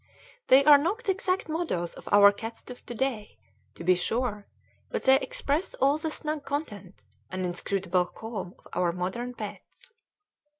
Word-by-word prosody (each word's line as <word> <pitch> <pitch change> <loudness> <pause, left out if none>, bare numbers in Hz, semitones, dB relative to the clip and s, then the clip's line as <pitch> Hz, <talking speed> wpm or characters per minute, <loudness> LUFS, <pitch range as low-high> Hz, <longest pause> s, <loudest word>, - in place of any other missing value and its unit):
They 270 +2 +6
are 295 -1 +9
not 390 +11 -2
exact 375 -1 0
models 310 - -2
of - - -10
our 200 0 +8
cats 225 +3 -7
of 250 - -11
to 240 - -6
day, 230 -4 -2 0.4
to - - -9
be 185 +2 +5
sure, 210 +3 -2 0.4
but - - -3
they 265 0 +6
express 370 - -2
all 280 +3 +2
the 320 - -2
snug 305 -1 -3
content 215 - -5 0.3
and 185 0 -3
inscrutable 180 0 0
calm 210 -5 -7
of - - -13
our 175 -1 +1
modern 215 +8 -4
pets. 210 - -9
235 Hz, 160 wpm, -27 LUFS, 190-295 Hz, 0.4 s, are